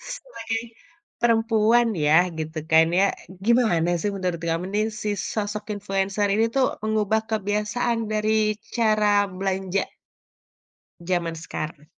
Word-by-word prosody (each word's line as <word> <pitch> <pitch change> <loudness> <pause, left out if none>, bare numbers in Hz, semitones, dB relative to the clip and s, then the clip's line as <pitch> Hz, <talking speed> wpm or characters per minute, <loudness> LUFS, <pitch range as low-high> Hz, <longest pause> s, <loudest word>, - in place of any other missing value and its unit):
sebagai - - -5 0.6
perempuan 230 0 +3
ya, 160 +3 +4
gitu 155 +1 -4
kan 160 0 +7
ya, 190 +3 +4 0.4
gimana 220 -8 +3
sih 205 - 0
menurut 180 -3 -2
kamu 165 +1 -1
nih, 215 +1 +2
si 215 -1 -4 0.2
sosok 210 0 -3
influencer 195 0 -1
ini 225 - +3
tuh 270 -1 +4 0.2
mengubah 220 0 +1
kebiasaan 210 +3 0
dari 215 0 +1 0.2
cara 215 -3 +3 0.2
belanja 190 0 -1 1.2
zaman 170 -2 -1
sekarang? 155 -2 -6
210 Hz, 115 wpm, -24 LUFS, 180-220 Hz, 1.2 s, kan